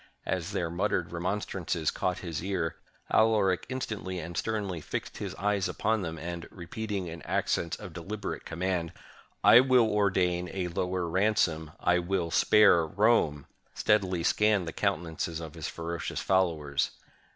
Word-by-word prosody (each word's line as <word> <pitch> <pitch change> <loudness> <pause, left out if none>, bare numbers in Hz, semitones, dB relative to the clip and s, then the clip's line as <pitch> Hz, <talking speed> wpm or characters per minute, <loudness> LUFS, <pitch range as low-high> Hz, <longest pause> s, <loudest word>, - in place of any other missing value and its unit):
As 90 0 -2
their 85 -4 -1
muttered 95 +5 0
remonstrances 85 -2 -2
caught 90 -1 -1
his 80 -2 -4
ear, 95 -4 -1 0.4
Alaric 105 -5 +3
instantly 110 -8 -4
and 85 0 -6
sternly 100 -6 -2
fixed - - -5
his - - -5
eyes 100 0 0
upon 110 -1 0
them; 80 -3 -4
and, 85 +1 -6
repeating 100 +2 -4
in 85 -1 -7
accents 85 +3 -1
of 95 -6 -9
deliberate 100 +5 -5
command, 85 0 -2 0.5
"I 115 - +9
will 130 -3 +5
ordain 95 -4 +1
a 90 -2 -2
lower 90 0 -1
ransom; 85 -4 +1
I 90 0 +3
will 90 -1 -1
spare 100 -4 +6
Rome," 95 -7 +2 0.3
steadily 95 -5 +2
scanned 105 -1 +3
the 80 - -4
countenances 85 -3 -2
of 80 -2 -7
his - - -5
ferocious 85 0 -4
followers. 80 -7 +1
90 Hz, 140 wpm, -29 LUFS, 85-100 Hz, 0.5 s, I